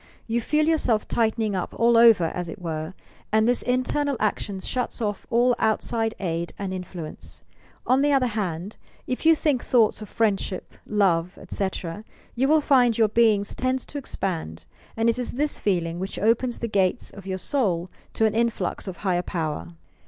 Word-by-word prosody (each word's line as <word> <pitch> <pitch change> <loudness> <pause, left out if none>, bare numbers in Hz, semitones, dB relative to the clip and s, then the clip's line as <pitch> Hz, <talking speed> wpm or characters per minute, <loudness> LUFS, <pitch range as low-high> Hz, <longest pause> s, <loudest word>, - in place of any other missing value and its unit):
You 235 +1 -1
feel 305 +5 +1
yourself 255 -9 +1
tightening 220 -2 0
up 180 - -3
all 235 0 +4
over, 230 -5 +7
as 175 -1 -4
it - - -8
were, 160 0 -4 0.4
and 220 +1 +3
this 245 0 +2
iuternal 260 +3 0
action 205 -2 -1
shuts 250 +5 -3
off 210 -3 -3
all 245 0 +3
outside 225 +1 0
aid 170 -2 -3
and 195 -2 -4
influence. 180 -3 -7 0.4
On 260 +2 +3
the 290 +1 +3
other 270 -2 +3
hand, 200 -4 -3 0.3
if 255 +5 -2
you 325 - +7
think 295 -5 0
thoughts 225 -3 +3
of 210 - -8
friendship, 200 -4 -1
love, 180 -4 +1
etc., 190 0 -4 0.3
you 260 +3 +1
will 310 +1 +4
find 250 -6 +4
your 220 -2 +4
being 220 -2 +4
tends 255 +5 -2
to 285 - -6
expand, 165 - -4 0.3
and 225 +1 +2
it 230 +1 +2
is 245 - -2
this 295 +3 0
feeling 170 -4 0
which 190 +2 -5
opens 235 +3 +1
the 235 - -3
gates 195 +1 0
of 195 -1 -11
your 190 -1 -2
soul 185 - 0 0.3
to 220 - +2
an 220 - +2
influx 225 -5 -1
of 185 -2 -5
higher 180 -2 +2
power. 165 -1 -4
215 Hz, 175 wpm, -25 LUFS, 185-245 Hz, 0.4 s, over